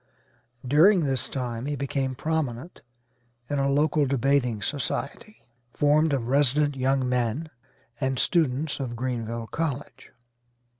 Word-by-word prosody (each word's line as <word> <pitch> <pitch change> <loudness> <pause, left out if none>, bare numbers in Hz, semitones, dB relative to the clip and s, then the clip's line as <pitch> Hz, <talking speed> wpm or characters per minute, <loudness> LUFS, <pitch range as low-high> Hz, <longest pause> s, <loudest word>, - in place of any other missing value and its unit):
During 170 +8 +5
this 135 -4 -1
time 125 -1 -4
he 145 - -1
became 135 -1 -2
prominent 155 -1 -3 0.7
in 145 - 0
a 135 0 +1
local 145 +1 +2
debating 130 -4 +1
society, 145 - -4 0.3
formed 150 +2 +3
of 130 -5 -1
resident 145 +2 +2
young 130 0 +1
men 125 +5 -1 0.5
and 130 0 -1
students 150 -2 +1
of 125 -3 -4
Greenville 115 -2 -3
College. 145 +1 -4
135 Hz, 115 wpm, -26 LUFS, 125-150 Hz, 0.7 s, During